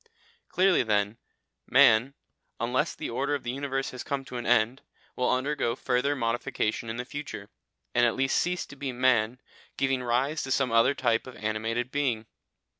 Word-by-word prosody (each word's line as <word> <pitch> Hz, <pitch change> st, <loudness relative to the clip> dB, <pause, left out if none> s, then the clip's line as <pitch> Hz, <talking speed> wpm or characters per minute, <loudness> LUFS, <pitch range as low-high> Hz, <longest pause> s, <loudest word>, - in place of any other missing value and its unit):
Clearly 185 Hz, 0 st, +4 dB
then, 105 Hz, -1 st, 0 dB, 0.5 s
man, 130 Hz, 0 st, +5 dB, 0.4 s
unless 130 Hz, +7 st, 0 dB
the -, -, -5 dB
order 140 Hz, +5 st, 0 dB
of 140 Hz, -, -5 dB
the 120 Hz, -, -2 dB
universe 135 Hz, 0 st, -2 dB
has 125 Hz, -, -7 dB
come 140 Hz, -1 st, -3 dB
to 125 Hz, -, -7 dB
an 120 Hz, -, -4 dB
end, 120 Hz, +2 st, +3 dB, 0.3 s
will 125 Hz, -, +1 dB
undergo 130 Hz, -2 st, 0 dB
further 130 Hz, +3 st, 0 dB
modification 115 Hz, -2 st, -1 dB
in 110 Hz, -, -4 dB
the 125 Hz, -, -4 dB
future, 145 Hz, +2 st, -7 dB, 0.4 s
and 120 Hz, -, +3 dB
at 120 Hz, 0 st, +2 dB
last 135 Hz, 0 st, +1 dB
cease 180 Hz, 0 st, 0 dB
to -, -, -12 dB
be 140 Hz, -1 st, -4 dB
man, 125 Hz, -1 st, +2 dB, 0.4 s
giving 135 Hz, -1 st, +1 dB
rise 130 Hz, +6 st, 0 dB
to 130 Hz, -, -5 dB
some 130 Hz, -2 st, +1 dB
other 115 Hz, +4 st, +4 dB
type 120 Hz, -2 st, +1 dB
of 130 Hz, -, -9 dB
animated 115 Hz, +3 st, -2 dB
being. 130 Hz, -6 st, 0 dB
125 Hz, 175 wpm, -28 LUFS, 115-140 Hz, 0.5 s, man